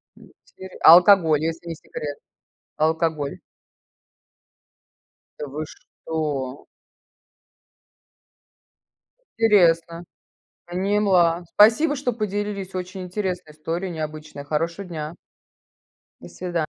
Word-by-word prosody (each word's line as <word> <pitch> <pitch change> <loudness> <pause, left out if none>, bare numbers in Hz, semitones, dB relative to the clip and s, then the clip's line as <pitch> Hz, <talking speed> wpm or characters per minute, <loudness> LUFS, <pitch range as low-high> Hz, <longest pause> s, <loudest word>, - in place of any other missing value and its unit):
Интере 190 0 -14
а 160 - +11
алкоголь, 175 -4 +6
если 165 +1 -4
не 165 - -4
секрет? 145 -1 -7 0.6
А 155 - +2
алкоголь? 160 -3 -1 2.0
Да 150 - -5
вы 150 +3 -5
что? 145 -6 -5 2.7
Интересно! 170 -6 +3 0.6
Поняла, 180 -2 +2
спасибо, 235 +9 +5
что 265 -3 -2
поделились! 205 -3 -4
Очень 185 +1 -5
интересная 180 -3 -4
история, 165 +5 -4
необычная. 155 -2 -6
Хорошего 165 +6 -2
дня! 155 -2 -6 1.1
До - - -11
свидания! 175 -3 -3
170 Hz, 85 wpm, -23 LUFS, 155-195 Hz, 2.7 s, а